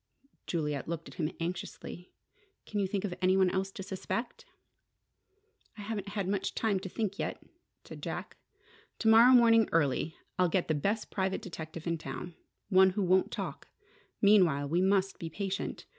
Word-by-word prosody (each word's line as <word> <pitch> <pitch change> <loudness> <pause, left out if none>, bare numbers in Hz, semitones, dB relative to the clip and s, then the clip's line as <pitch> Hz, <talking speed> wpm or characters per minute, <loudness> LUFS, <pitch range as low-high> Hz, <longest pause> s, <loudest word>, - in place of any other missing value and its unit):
Juliet 150 -4 -2
looked 165 0 -4
at - - -13
him 155 -1 -2
anxiously. 180 +1 -6 0.5
"Can 210 - -3
you 195 - +1
think 195 0 -2
of 190 - -3
any 185 +1 +4
one 190 -1 +4
else 190 0 -1
to 195 - -6
suspect?" 235 - -4 1.3
"I - - -7
haven't 205 -1 -4
had 195 -2 -1
much 195 0 -1
time 210 -4 +1
to 190 0 -7
think 205 -1 -3
yet," - - -3 0.4
said - - -10
Jack. - - -5 0.6
"To 225 - -1
morrow 230 +3 +8
morning 230 -3 +6
early, 160 +1 +1 0.2
I'll 180 -1 +4
get 180 +1 0
the 155 - +1
best 200 +9 -1
private 190 -1 -1
detective 165 -2 -7
in 170 -1 -1
town: 155 +5 -6 0.4
one 190 -1 +6
who 195 +2 -1
won't 185 +1 +3
talk. - - -5 0.6
Meanwhile, 180 -9 +5
we 170 +4 +2
must 195 0 +2
be 165 - -5
patient. 195 +4 -4
190 Hz, 170 wpm, -31 LUFS, 170-205 Hz, 1.3 s, morrow